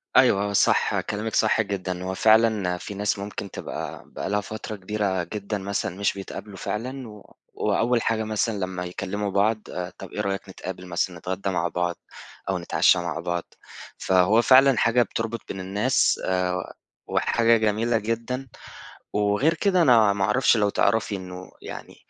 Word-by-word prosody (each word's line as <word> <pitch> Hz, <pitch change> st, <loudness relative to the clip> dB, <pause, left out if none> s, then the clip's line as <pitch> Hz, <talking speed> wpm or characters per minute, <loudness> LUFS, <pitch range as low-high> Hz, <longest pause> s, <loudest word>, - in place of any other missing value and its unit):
أيوه، 100 Hz, +1 st, +5 dB
آه، -, -, -4 dB
صح، -, -, +3 dB
كلامِك 110 Hz, +2 st, -4 dB
صح 110 Hz, +1 st, +3 dB
جدًا. 95 Hz, -3 st, -3 dB
هو 95 Hz, -, -3 dB
فعلًا 110 Hz, -5 st, +3 dB
في 100 Hz, -, -7 dB
ناس 100 Hz, 0 st, -1 dB
ممكن 100 Hz, -1 st, -6 dB
تبقى -, -, -6 dB
بقى 70 Hz, +5 st, -5 dB
لها 105 Hz, +1 st, +1 dB
فترة 110 Hz, +1 st, -6 dB
كبيرة 100 Hz, -2 st, -1 dB
جدًا 105 Hz, +3 st, -4 dB
مثلًا، 100 Hz, -2 st, -3 dB
مش 100 Hz, +1 st, 0 dB
بيتقابلوا 100 Hz, +1 st, -8 dB
فعلًا، 115 Hz, 0 st, -5 dB, 0.3 s
وأول 120 Hz, 0 st, +1 dB
حاجة 110 Hz, 0 st, 0 dB
مثلًا 110 Hz, 0 st, -1 dB
لمّا 95 Hz, -1 st, -3 dB
يكلِّموا 100 Hz, +3 st, -3 dB
بعض، 105 Hz, +3 st, +2 dB
آآ، 90 Hz, 0 st, -4 dB
"طب، -, -, -9 dB
إيه -, -, -3 dB
رأيك، 95 Hz, 0 st, -3 dB
نتقابل 90 Hz, 0 st, -7 dB
مثلًا، 90 Hz, 0 st, -1 dB
نتغدَّى 95 Hz, +3 st, -3 dB
مع 85 Hz, -2 st, 0 dB
بعض 90 Hz, 0 st, -1 dB, 0.5 s
أو -, -, +1 dB
نتعشَّى 90 Hz, -, +3 dB
مع 85 Hz, -1 st, -3 dB
بعض؟" 85 Hz, 0 st, -2 dB, 0.5 s
فهو 95 Hz, +5 st, +4 dB
فعلًا 130 Hz, 0 st, +6 dB
حاجة 115 Hz, +2 st, +4 dB
بتربط 115 Hz, +1 st, -3 dB
بين 95 Hz, -, -5 dB
الناس، 95 Hz, +3 st, +1 dB
آآ، 90 Hz, -1 st, -1 dB, 0.3 s
وحاجة 115 Hz, 0 st, +3 dB
جميلة 110 Hz, +2 st, +1 dB
جدًا. 115 Hz, +4 st, -3 dB, 0.7 s
وغير 105 Hz, +10 st, +2 dB
كده، 185 Hz, +1 st, +2 dB
أنا 115 Hz, -8 st, +5 dB
ما 100 Hz, -1 st, -1 dB
اعرفش، 120 Hz, +3 st, +3 dB
لو 105 Hz, -1 st, +2 dB
تعرفي 105 Hz, +1 st, +1 dB
إنه 90 Hz, -1 st, -8 dB
يعني، -, -, -9 dB
100 Hz, 160 wpm, -25 LUFS, 95-110 Hz, 0.7 s, فعلًا